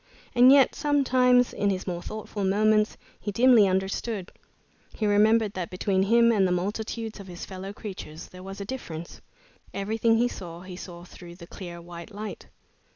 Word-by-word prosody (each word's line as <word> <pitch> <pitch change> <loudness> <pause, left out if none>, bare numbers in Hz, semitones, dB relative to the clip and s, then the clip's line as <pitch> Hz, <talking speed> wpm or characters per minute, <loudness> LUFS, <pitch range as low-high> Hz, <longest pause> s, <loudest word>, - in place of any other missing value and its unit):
And 250 +1 +7
yet 275 -1 +6
some 290 -1 +1
times, 250 -1 +4
in 205 - 0
his 190 -1 -2
more 175 -2 -3
thoughtful 215 0 -6
moments, 215 +2 +2 0.2
he 205 - -4
dimly 235 -1 +6
understood. 190 +1 -2 0.6
He 215 - -2
remembered 210 +1 +3
that 180 -2 -4
between 190 +1 0
him 235 +4 +4
and 200 -4 +3
the - - -1
multitudes 215 +4 -3
of 200 - -10
his 175 -1 -8
fellow 190 +1 -7
creatures 185 -7 -8
there 185 - -12
was 195 +1 -8
a 200 - -5
difference. 170 -9 -7 0.5
Everything 225 +3 +1
he 240 +2 +3
saw, 175 -7 -8
he 185 0 -9
saw 175 -1 -9
through 175 -1 -12
the 170 -1 -12
clear 175 -1 -9
white 170 +1 -10
light. 210 0 -7
200 Hz, 175 wpm, -26 LUFS, 185-225 Hz, 0.6 s, And